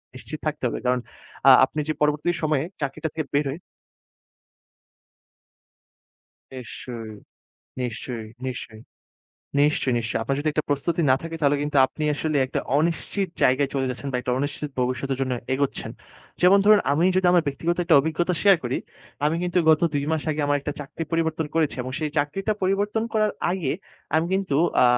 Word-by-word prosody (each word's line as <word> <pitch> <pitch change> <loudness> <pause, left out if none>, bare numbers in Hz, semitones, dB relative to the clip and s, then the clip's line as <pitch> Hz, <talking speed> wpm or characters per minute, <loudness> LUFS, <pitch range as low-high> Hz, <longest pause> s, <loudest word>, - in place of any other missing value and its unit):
নিশ্চিত 150 +4 -7
থাকতে 150 - -3
হবে। - - -3
কারণ 125 0 +2 0.5
আ - - +11
আপনি 155 - -6
যে 155 - 0
পরবর্তী 150 +2 +2
সময়ে 155 -3 +1 0.2
চাকরিটা 140 +3 -2
থেকে 155 -2 -3
বের 145 +1 +2
হয়ে 140 +5 -5 2.9
নিশ্চয়ই, 115 -3 -7 0.7
নিশ্চয়ই, 120 -2 -4 0.2
নিশ্চয়ই, 120 -3 -6 0.8
নিশ্চয়ই, 145 -2 +3
নিশ্চয়ই। 115 -1 -1
আপনার 135 +4 -1
যদি 155 - -1
একটা 155 +1 -1
প্রস্তুতি 155 +4 0
না 130 - +6
থাকে 165 0 -5
তাহলে 145 -1 +3
কিন্তু 145 0 -2
আপনি 155 +3 -5
আসলে 155 +1 -1
একটা 130 - -2 0.2
অনিশ্চিত 170 +4 -1
জায়গায় 135 +2 +3
চলে 135 -1 0
যাচ্ছেন 130 +3 -5
বা - - 0
একটা 125 - -2
অনিশ্চিত 145 +1 -3
ভবিষ্যতের 130 +1 -1
জন্য 130 -1 0 0.2
এগোচ্ছেন। 140 0 -2 0.5
যেমন 185 +3 +7
ধরুন, 210 0 +7
আমি 155 +4 +2
যদি 185 -1 +3
আমার 175 -2 +5
ব্যক্তিগত 165 +5 -1
একটা - - +4
অভিজ্ঞতা 165 +4 0
শেয়ার 200 -2 +7
করি, 120 +2 -1 0.5
আমি 155 +2 +2
কিন্তু 180 0 0
গত 155 - +4
২ 140 -1 0
মাস 160 -2 0
আগে 155 0 -2
আমার 145 0 +2
একটা 145 +1 -4
চাকরি 145 +3 -6
পরিবর্তন 160 -1 0
করেছি। 160 -3 +1
এবং 130 - -6
সেই 155 -1 -1
চাকরিটা 195 +9 0
পরিবর্তন 205 +3 +1
করার 215 -1 +2 0.2
আগে 175 -7 -1 0.4
আমি 160 +1 +3
কিন্তু 190 -7 0 0.3
আ - - +6
150 Hz, 165 wpm, -24 LUFS, 135-165 Hz, 2.9 s, আ